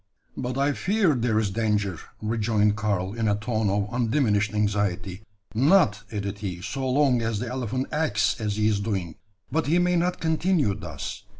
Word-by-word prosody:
"But 125 0 -3
I 140 +1 +2
fear 185 - +2
there 120 -3 +1
is 110 -3 +1
clanger," 105 -4 0 0.2
rejoined 110 -1 +1
Karl, 100 -3 -1
in 115 -1 -1
a 105 - +3
tone 110 0 -1
of 100 +1 0
undiminished 115 -4 +1
anxiety. 100 -2 -1 0.3
"Not," 135 - +4
added 100 -1 -4
he, 95 -4 -4
"so 135 -1 -3
long 130 -2 +3
as 115 -1 -1
the 120 +4 -3
elephant 130 +1 -2
acts 110 -10 +1
as 105 -2 -1
he 105 0 +2
is 105 -2 +2
doing; 95 -6 -2 0.4
but 160 -1 0
he 165 +4 +3
may 180 0 +2
not 175 +1 0
continue 160 - +1
thus. 100 - -7
110 Hz, 175 wpm, -25 LUFS, 105-130 Hz, 0.4 s, Not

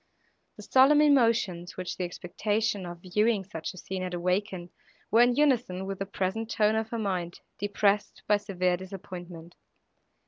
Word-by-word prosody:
The - - -11
solemn 270 +3 +5
emotions, 230 - +2
which 185 -1 -4
the 180 - -2
expectation 205 +3 -2
of 175 0 -9
viewing 210 +3 +1
such 165 -4 -6
a 185 - -15
scene 185 +1 -5
had 180 -1 -3
awakened, 180 0 -2 0.4
were 230 - +6
in 245 0 +4
unison 245 -10 +1
with 195 0 -5
the 195 - -3
present 200 +3 -2
tone 215 -1 +2
of 220 0 -1
her 235 - -3
mind, 185 -5 -3 0.2
depressed 205 0 0
by 210 - +4
severe 185 -3 -1
disappointment. 175 -2 -9
195 Hz, 160 wpm, -28 LUFS, 180-220 Hz, 0.4 s, were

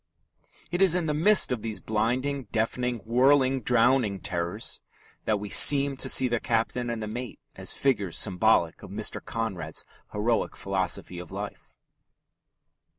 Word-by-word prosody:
It 175 +2 -2
is 185 -3 +4
in 180 -2 -1
the 150 - -1
midst 190 +5 +4
of 125 -3 -2
these 110 -1 -3
blinding, 125 +5 -2
deafening, 115 +2 -3
whirling, 130 +2 +2
drowning 120 -3 +1
terrors 85 -1 -4 0.4
that 105 -2 0
we 105 - -7
seem 140 +5 +7
to - - -2
see 130 - +6
the 120 -1 -1
captain 120 +2 -2
and 115 -2 -4
the - - -5
mate 120 +3 -7 0.2
as - - -3
figures 105 -10 -1
symbolic 95 -4 +1
of - - -11
Mr. - - -3
Conrad's 95 -9 -5 0.3
heroic 110 +3 -1
philosophy 95 -2 -3
of 90 -2 -10
life. - - -9
115 Hz, 150 wpm, -26 LUFS, 105-130 Hz, 0.4 s, seem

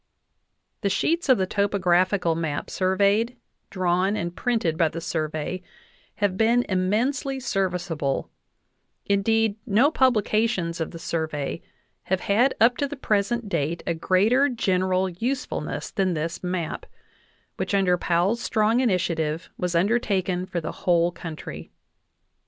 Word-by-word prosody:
The 200 - +1
sheets 325 - 0
of 260 - +6
the 190 - +1
topographical 185 -2 +2
map 160 -3 -3
surveyed, 200 +6 +1 0.3
drawn, 185 +2 +1
and 175 -3 -3
printed 225 -10 0
by 165 0 +3
the 165 - -6
Survey 155 +2 -3 0.5
have 200 -2 0
been 235 +3 +3
immensely 240 +9 0
serviceable; 180 - -2 0.7
in 200 0 +2
deed, 225 0 +2
no 240 +8 +4
publications 215 - +1
of 160 - -2
the - - -9
Survey 160 -4 -3 0.4
have 190 0 0
had 235 +7 +2
up 240 +2 +5
to 285 - 0
the 290 - -6
present 225 -2 0
date 165 -2 -2
a 170 - 0
greater 210 - +3
general 185 -5 +1
usefulness 245 +10 -3
than 190 -4 0
this 165 +2 -3
map, 180 -3 -3 0.7
which, - - -1
under 190 -2 +3
Powell's 180 +6 +1
strong 220 +2 +2
initiative, 170 -8 0
was 180 -1 -2
undertaken 190 -2 +1
for 180 -2 -2
the 160 - -4
whole 175 -1 +2
coun 170 -2 -7
try. - - -8
190 Hz, 135 wpm, -25 LUFS, 170-225 Hz, 0.7 s, of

